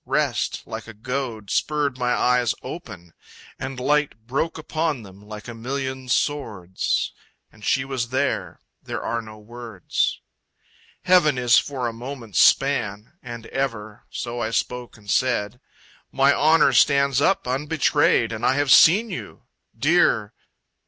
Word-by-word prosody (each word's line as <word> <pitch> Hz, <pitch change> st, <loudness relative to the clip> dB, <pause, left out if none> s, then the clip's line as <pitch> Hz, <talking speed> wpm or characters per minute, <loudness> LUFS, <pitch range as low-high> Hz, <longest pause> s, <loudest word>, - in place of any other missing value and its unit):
Rest, -, -, 0 dB
like -, -, -7 dB
a 115 Hz, -, -10 dB
goad, 115 Hz, -2 st, -4 dB
Spurred 150 Hz, -3 st, 0 dB
my 125 Hz, 0 st, 0 dB
eyes 125 Hz, -1 st, +2 dB
open 95 Hz, -, -9 dB, 0.5 s
and 130 Hz, -1 st, -5 dB
light 150 Hz, +3 st, +1 dB
broke 140 Hz, +7 st, -2 dB
Upon 155 Hz, -4 st, -2 dB
them 95 Hz, 0 st, -14 dB
like 105 Hz, +1 st, -10 dB
a 120 Hz, -, -6 dB
million 130 Hz, +2 st, -4 dB
swords: 105 Hz, -, -1 dB, 0.4 s
And 110 Hz, -, -19 dB
she 130 Hz, +4 st, +1 dB
was 130 Hz, -3 st, -3 dB
there. 130 Hz, +2 st, -1 dB, 0.2 s
There -, -, -5 dB
are 115 Hz, 0 st, -2 dB
no 110 Hz, -1 st, -12 dB
words. 115 Hz, -3 st, -3 dB, 0.8 s
Heaven 175 Hz, -7 st, +4 dB
is 125 Hz, -1 st, +5 dB
for 130 Hz, -4 st, -3 dB
a 115 Hz, -, -4 dB
moment's 120 Hz, -3 st, -5 dB
span. 110 Hz, -5 st, +2 dB
And 120 Hz, -2 st, -8 dB
ever. 110 Hz, -6 st, -4 dB
So 120 Hz, 0 st, -5 dB
I 110 Hz, -2 st, -1 dB
spoke 125 Hz, +1 st, -3 dB
and 105 Hz, -2 st, -19 dB
said, 120 Hz, +1 st, 0 dB, 0.5 s
"My 135 Hz, +1 st, +4 dB
honor 155 Hz, +1 st, +4 dB
stands 140 Hz, -1 st, +4 dB
up 195 Hz, +5 st, +2 dB
unbetrayed, 145 Hz, +4 st, +2 dB
And -, -, -6 dB
I 130 Hz, -, +3 dB
have 145 Hz, -1 st, +1 dB
seen 210 Hz, +8 st, +6 dB
you. -, -, -8 dB, 0.3 s
Dear..." -, -, +2 dB
125 Hz, 140 wpm, -23 LUFS, 115-140 Hz, 0.8 s, seen